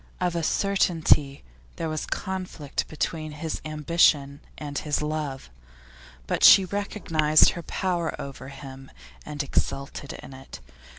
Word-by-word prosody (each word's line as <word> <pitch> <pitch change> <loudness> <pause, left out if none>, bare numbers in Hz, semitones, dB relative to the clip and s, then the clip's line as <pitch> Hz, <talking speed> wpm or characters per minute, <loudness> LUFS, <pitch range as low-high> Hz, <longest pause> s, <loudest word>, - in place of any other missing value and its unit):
Of 180 -1 0
a 170 - 0
certainty 160 - +2 0.3
there 165 - -3
was 155 -1 -3
conflict 185 -7 -4
between 155 0 -3
his 155 +1 -4
ambition 150 -2 +2 0.2
and 145 -2 -7
his 150 -2 -1
love, 150 - -4 0.7
but - - -2
she 195 - +9
recognised 165 -6 +3
her 170 - -6
power 175 0 -2
over 140 -1 -7
him 135 -1 -10 0.4
and 150 -1 -3
exulted 140 0 -3
in 135 - -10
it. 130 - -11
155 Hz, 125 wpm, -26 LUFS, 140-170 Hz, 0.7 s, she